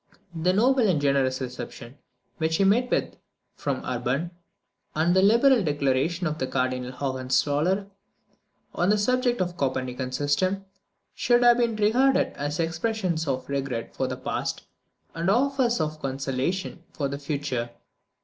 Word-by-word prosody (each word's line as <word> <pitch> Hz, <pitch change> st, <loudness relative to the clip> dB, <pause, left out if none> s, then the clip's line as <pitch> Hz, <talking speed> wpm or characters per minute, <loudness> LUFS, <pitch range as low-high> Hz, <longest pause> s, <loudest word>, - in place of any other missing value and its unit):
The 170 Hz, +2 st, +1 dB
noble 240 Hz, +4 st, +3 dB
and 165 Hz, -5 st, +2 dB
generous 140 Hz, -2 st, +1 dB
reception 125 Hz, +1 st, -7 dB, 0.4 s
which 160 Hz, 0 st, +1 dB
he 195 Hz, -, +2 dB
met 235 Hz, +6 st, +3 dB
with -, -, -1 dB, 0.4 s
from 140 Hz, -2 st, -3 dB
Urban, 130 Hz, +7 st, -2 dB, 0.6 s
and 165 Hz, +3 st, +2 dB
the 190 Hz, -, +5 dB
liberal 235 Hz, +4 st, +5 dB
declaration 145 Hz, +3 st, 0 dB
of 155 Hz, -1 st, -2 dB
Cardinal 125 Hz, -1 st, -1 dB
Hohenzoller 145 Hz, +8 st, 0 dB, 0.9 s
on 175 Hz, -, +1 dB
the 210 Hz, -, +4 dB
subject 245 Hz, +1 st, +1 dB
of 180 Hz, -, +1 dB
the -, -, -13 dB
Copernican 130 Hz, -1 st, -2 dB
system, 145 Hz, +9 st, 0 dB, 0.5 s
should 240 Hz, 0 st, +2 dB
have 240 Hz, 0 st, +6 dB
been 235 Hz, -2 st, +1 dB
regarded 245 Hz, +6 st, +3 dB
as 145 Hz, +2 st, -3 dB
expressions 170 Hz, 0 st, -1 dB
of 130 Hz, -2 st, -2 dB
regret 135 Hz, -4 st, -3 dB
for -, -, -1 dB
the -, -, -4 dB
past, -, -, -3 dB, 0.5 s
and 170 Hz, +3 st, -1 dB
offers 250 Hz, +1 st, +2 dB
of 155 Hz, -1 st, -2 dB
conciliation 135 Hz, +7 st, -2 dB
for 140 Hz, -, -2 dB
the 140 Hz, +1 st, -5 dB
future. 140 Hz, -5 st, -3 dB
160 Hz, 140 wpm, -26 LUFS, 135-205 Hz, 0.9 s, have